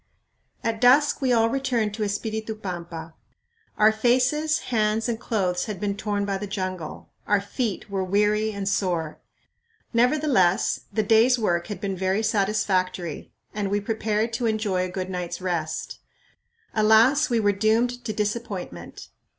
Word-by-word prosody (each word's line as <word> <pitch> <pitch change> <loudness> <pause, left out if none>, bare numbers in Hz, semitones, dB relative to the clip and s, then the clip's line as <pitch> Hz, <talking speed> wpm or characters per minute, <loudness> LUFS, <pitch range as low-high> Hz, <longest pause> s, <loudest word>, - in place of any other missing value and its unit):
At 225 0 -2
dusk 275 +5 +5
we 260 -2 +2
all 225 -2 +4
returned 235 -4 0
to 215 0 -3
Espiritu 220 +2 -3
Pampa. 170 -5 -7 0.6
Our 215 +1 +6
faces, 255 +8 +2 0.2
hands, 215 0 +1
and 230 -2 -2
clothes 185 -7 -1
had 210 -4 -5
been 200 0 -1
torn 205 0 -2
by 195 -1 -2
the 205 - -5
jungle; 185 -4 -5 0.2
our 205 - +3
feet 210 +1 -3
were 195 -2 -2
weary 210 +3 +1
and 200 -2 -4
sore. 175 -5 -1 0.7
Nevertheless 240 -7 +3
the 215 - 0
day's 225 +4 +4
work 175 -7 0
had 205 -4 -5
been 195 -1 -3
very 190 +3 0
satisfactory 195 -5 -1 0.2
and 205 -1 -2
we 205 +1 +1
prepared 220 +1 -1
to 235 0 0
enjoy 210 -4 0
a - - -5
good 185 +1 -4
night's 175 -1 -4
rest. 175 -4 -3 0.7
Alas, 225 +8 +4
we 235 -2 +2
were 205 -2 +3
doomed 225 +5 +1
to 230 - -3
disappointment. 205 - -4
210 Hz, 150 wpm, -24 LUFS, 190-225 Hz, 0.7 s, Our